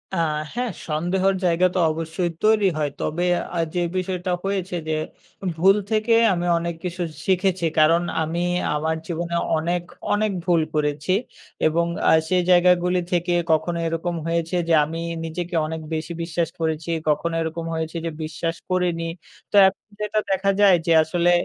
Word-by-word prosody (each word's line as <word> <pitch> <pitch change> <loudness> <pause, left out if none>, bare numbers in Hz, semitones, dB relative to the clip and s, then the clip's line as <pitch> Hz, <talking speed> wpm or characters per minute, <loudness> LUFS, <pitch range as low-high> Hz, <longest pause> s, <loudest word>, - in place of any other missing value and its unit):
আ 170 - 0 0.3
হ্যাঁ, 245 -2 -2 0.2
সন্দেহের 185 +5 +1
জায়গা 175 +1 +3
তো 185 - +2
অবশ্যই 165 +2 -2
তৈরি 215 -2 +4
হয়। 150 -2 0
তবে 175 +3 -1 0.3
আ - - 0 0.2
যে 175 - +1 0.2
বিষয়টা 185 0 -2
হয়েছে 195 -2 -2
যে 155 - +1 0.6
ভুল 195 +4 +5 0.2
থেকে 220 +1 +2 0.2
আমি 175 0 -2
অনেক 170 0 -3
কিছু 180 0 -4 0.2
শিখেছি। 185 -2 +1
কারণ 165 +2 +5 0.2
আমি 170 +3 -2 0.3
আমার 160 +2 0
জীবনে 170 0 -3 0.2
অনেক, 175 +2 -1 0.3
অনেক, 210 0 +1
ভুল 170 -3 +3
করেছি 150 +3 0 0.5
এবং 170 +2 +1 0.2
আ - - +6 0.2
সেই 180 -1 +2
জায়গাগুলি 180 0 +4
থেকে 175 0 +1 0.2
কখনো 165 +2 +1
এরকম 165 +1 -2
হয়েছে 165 +1 -1
যে 165 - +3
আমি 165 +2 -5 0.3
নিজেকে 170 +2 -4
অনেক 160 0 -5
বেশি 160 +2 -3
বিশ্বাস 165 0 -1
করেছি, 160 0 -2 0.2
কখনো 165 +3 0
এরকম 165 +1 -3
হয়েছে 160 +1 -3
যে 165 - -2
বিশ্বাস 165 +2 -3
করিনি। 175 -2 0 0.4
তো - - -2
এখন 190 0 +1 0.2
যেটা 210 0 0
দেখা 195 +1 +2
যায় 195 -3 +7
যে 165 - +3
আসলে 175 +2 +1
170 Hz, 155 wpm, -23 LUFS, 165-185 Hz, 0.6 s, যায়